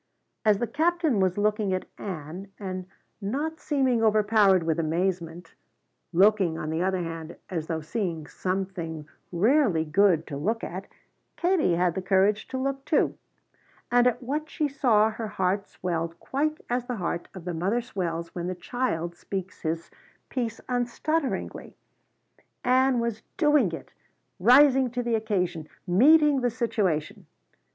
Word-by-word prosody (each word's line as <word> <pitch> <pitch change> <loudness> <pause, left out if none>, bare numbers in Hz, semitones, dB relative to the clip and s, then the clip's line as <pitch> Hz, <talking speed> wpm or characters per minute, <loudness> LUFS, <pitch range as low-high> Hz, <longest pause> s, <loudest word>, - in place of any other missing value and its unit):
As 210 -2 +4
the 240 - -1
Captain 315 - +1
was 185 -1 +1
looking 210 -2 +1
at 185 - -4
Ann 180 0 -6
and 185 -2 -5 0.3
not 290 +11 -2
seeming 260 -5 +1
overpowered 210 -4 +4
with 160 0 0
amazement, 170 0 -2 0.6
looking, 190 -2 +4
on 155 - -4
the 160 +1 -1
other 185 -1 0
hand, 165 0 -6 0.2
as 160 -3 -3
though 160 -1 -2
seeing 165 -2 -3
something 180 -4 -4 0.2
rarely 200 - +3
good 165 0 +3
to 140 - -6
look 220 +10 -1
at, 190 +3 -5 0.5
Katie 345 - +2
had 175 0 +2
the 190 - -3
courage 195 +3 +2
to 260 - -4
look 270 +1 -2
too. 300 - +1 0.8
And 245 0 +5
at 245 +1 0
what 300 +5 -3
she 305 -3 0
saw 235 -6 +3
her 220 0 -5
heart 195 0 -1
swelled 170 -2 -3
quite 305 +3 -1
as 245 0 -1
the 250 - -2
heart 175 -3 -3
of 180 -2 -9
the 180 - -3
mother 190 +8 0
swells 170 -8 -4
when 175 -1 -4
the 185 - -3
child 175 -4 -2
speaks 190 +1 -6
his 165 +1 -3 0.4
piece 235 -4 -3
unstutteringly. 255 +5 -2 0.9
Ann 255 0 +3
was 235 -2 -2 0.2
doing 295 - +4
it! 165 - -8 0.5
rising 260 +4 +6
to 245 +1 -3
the 235 -1 -1
occasion 180 -8 -1 0.2
meeting 285 - +5
the 245 - +2
situation. 210 -10 -1
200 Hz, 145 wpm, -26 LUFS, 175-245 Hz, 0.9 s, rising